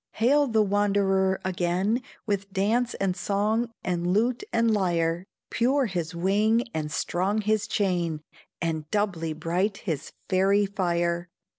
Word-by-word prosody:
Hail 280 +6 +3
the 220 -3 +3
wanderer 195 -2 +2
again, 185 +5 0 0.2
With 200 -2 -2
dance 225 +6 +1
and 195 -2 0
song, 215 +5 0
and 175 -1 -1
lute 235 - +1
and 230 0 +2
lyre, 175 -2 0 0.2
Pure 260 +4 +2
his 175 -5 -3
wing 210 +6 +2
and 150 -1 -3
strong 190 +7 0
his 215 0 0
chain, 175 -6 0 0.4
And 160 -2 -2
doubly 180 -6 -1
bright 175 +6 -1
his 160 -4 -3 0.2
fairy 195 +2 +3
fire. 175 -3 -1
195 Hz, 130 wpm, -26 LUFS, 175-215 Hz, 0.4 s, Hail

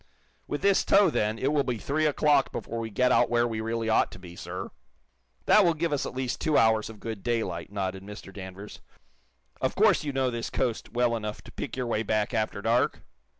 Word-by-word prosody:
"With 145 - -4
this 200 -1 +4
tow, 200 0 +5
then, 105 +1 0
it 135 +5 0
will 145 -2 +3
be 125 -3 -2
three 155 +7 0
o'clock 145 -1 +3
before 115 - -5
we 115 -1 -4
get 125 +4 +2
out - - +4
where 120 0 +2
we 110 -1 -3
really 115 0 -2
ought 110 - +3
to - - -10
be, 90 -2 -11
sir." - - -6 0.7
"That 215 - +6
will 170 -3 +3
give 165 0 -1
us 145 - -1
at - - -8
least 130 -1 -3
two 155 -2 +2
hours 110 -1 +3
of 110 -2 -11
good 110 -2 -6
daylight," 100 -8 -2
nodded 95 -2 -3
Mr. 100 0 -10
Danvers. 95 +1 -9 0.8
"Of - - 0
course - - +4
you 145 - -2
know 135 -2 0
this 115 -1 -4
coast 120 -3 -2
well 120 0 +1
enough 105 -1 -5
to - - -12
pick - - -6
your 130 - -1
way 115 -2 0
back 110 -1 0
after 110 -2 -1
dark?" 115 +2 +1
115 Hz, 220 wpm, -27 LUFS, 105-135 Hz, 0.8 s, That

